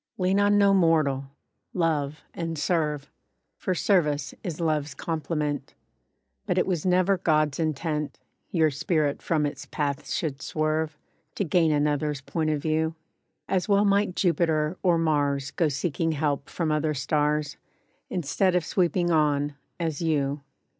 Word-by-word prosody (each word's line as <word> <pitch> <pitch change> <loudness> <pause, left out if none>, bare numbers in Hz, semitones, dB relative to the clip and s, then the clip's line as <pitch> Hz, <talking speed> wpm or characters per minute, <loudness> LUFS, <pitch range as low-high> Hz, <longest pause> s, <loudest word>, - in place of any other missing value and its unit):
LEAN 190 +1 +2
on 205 0 +4
no 200 -1 +5
mortal, 155 -7 +2 0.5
Love, 155 -4 0
and 165 -1 -4
serve; 150 -2 -1 0.5
(For 185 - -1
service 150 -8 +1
is 170 -3 -4
love's 155 -3 -1
complement), 150 -3 -3 0.7
But - - 0
it - - +3
was 180 -2 -1
never 185 +1 +3
God's 155 -4 +1
intent, 155 -1 -2 0.3
Your 160 -3 +2
spirit 150 0 0
from 155 -3 +1
its 145 - -5
path 145 -1 -3
should 145 -5 -2
swerve, 155 0 -1 0.4
To - - 0
gain 165 -1 +3
another's 150 -1 0
point 155 +3 -2
of 150 -1 0
view. 160 0 0 0.5
As 190 +1 0
well 200 +1 +4
might 200 -2 +2
Jupiter, 165 -3 +1
or 175 -3 +3
Mars 145 -4 +1
Go 160 +3 +1
seeking 165 +2 -1
help 145 -2 -1
from 165 -3 -1
other 155 0 0
stars, 150 +1 0 0.5
Instead 180 +2 +1
of 175 -3 +1
sweeping 175 -1 +1
ON, 145 -2 +2 0.3
as 160 -3 -2
you. 145 -3 0
155 Hz, 140 wpm, -26 LUFS, 145-170 Hz, 0.7 s, no